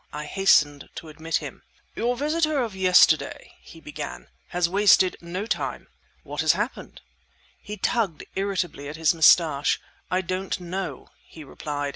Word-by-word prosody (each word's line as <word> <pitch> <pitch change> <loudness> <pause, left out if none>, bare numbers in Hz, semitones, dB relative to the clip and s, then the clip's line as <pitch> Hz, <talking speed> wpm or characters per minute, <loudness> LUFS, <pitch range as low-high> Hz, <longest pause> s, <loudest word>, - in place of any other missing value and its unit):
I 150 +1 -6
hastened 150 -5 +2
to 160 - -8
admit 160 +1 -4
him. - - -4 0.3
"Your 245 +1 -1
visitor 305 +1 0
of 220 -5 -5
yesterday," 185 -1 +3
he - - -14
began, - - -8 0.2
"has 175 -1 0
wasted 190 0 +4
no 180 +4 -5
time!" - - -3 0.3
"What - - -4
has - - +4
happened?" - - -5 0.6
He 210 0 -7
tugged 200 -5 -1
irritably 190 -7 -3
at 150 - -7
his 160 0 +2
moustache. 160 -3 +4 0.3
"I 185 +1 +1
don't 185 +1 -3
know!" 185 +2 -6 0.2
he 160 - -12
replied. 145 0 -5
180 Hz, 145 wpm, -24 LUFS, 160-200 Hz, 0.6 s, wasted